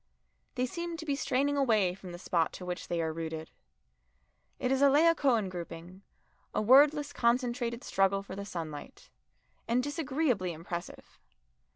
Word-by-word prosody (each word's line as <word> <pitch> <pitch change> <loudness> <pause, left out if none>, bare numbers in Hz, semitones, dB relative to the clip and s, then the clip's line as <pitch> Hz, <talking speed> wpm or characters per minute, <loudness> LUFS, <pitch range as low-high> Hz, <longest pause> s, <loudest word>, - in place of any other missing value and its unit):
They 250 0 +1
seem 340 +5 -5
to 320 - -7
be 285 -2 0
straining 280 +1 0
away 215 -9 +3
from 185 -1 -10
the 175 - -7
spot 170 -2 0
to 180 - -8
which 180 0 -5
they 170 -1 -1
are 160 0 -2
rooted. 160 -1 -5 1.1
It 250 - -1
is 270 0 +2
a 280 - +7
Laocoon 280 -7 +4
grouping, 175 +1 -8 0.5
a - - +2
wordless 285 +4 +5
concentrated 240 0 0
struggle 195 -3 +1
for 190 - -8
the 200 - -5
sunlight, 165 - -7 0.6
and 245 +2 +2
disagreeably 270 - -1
impressive. 170 +2 -8
230 Hz, 150 wpm, -30 LUFS, 180-280 Hz, 1.1 s, a